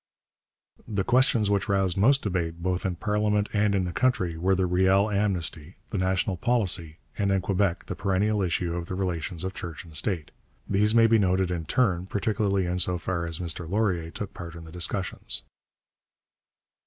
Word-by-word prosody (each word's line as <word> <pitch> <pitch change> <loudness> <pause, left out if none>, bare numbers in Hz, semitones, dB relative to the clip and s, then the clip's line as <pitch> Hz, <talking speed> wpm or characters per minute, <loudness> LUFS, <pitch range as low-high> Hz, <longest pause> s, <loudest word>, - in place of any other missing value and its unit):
The 100 -3 -1
questions 120 -4 +3
which 100 -3 0
roused 95 -3 +2
most 135 +8 +4
debate 85 -4 -2
both 95 +2 0
in 90 - -2
parliament 105 +1 0
and 105 -1 +2
in 95 - +1
the 90 - -3
country 95 -7 +1
were 95 +4 +2
the 95 0 +1
Riel 95 +3 +3
Amnesty, 90 -5 0 0.2
the 100 - -1
National 95 +1 0
Policy, 90 -7 0 0.2
and, 100 -1 +2
in 95 - +3
Quebec, 95 -1 0
the - - -4
perennial 100 +4 +1
issue 90 -1 0
of 85 -1 -4
the 95 - -4
relations 90 -2 -2
of 95 0 -3
church 85 -5 -7
and 80 -2 -13
state. 80 -1 -2 0.4
These 105 +3 +2
may 115 -1 +7
be 115 0 +5
noted 95 -1 +2
in 85 -3 -3
turn, 95 - +1
particularly 100 -1 0
in 90 +1 -1
so 90 0 +2
far 85 -1 -2
as 85 -1 -3
Mr 85 -1 -4
Laurier 95 -5 0
took 100 +4 -6
part 85 -2 -8
in 85 - -9
the 80 - -11
discussions. 90 +2 -3
95 Hz, 180 wpm, -26 LUFS, 85-105 Hz, 0.4 s, may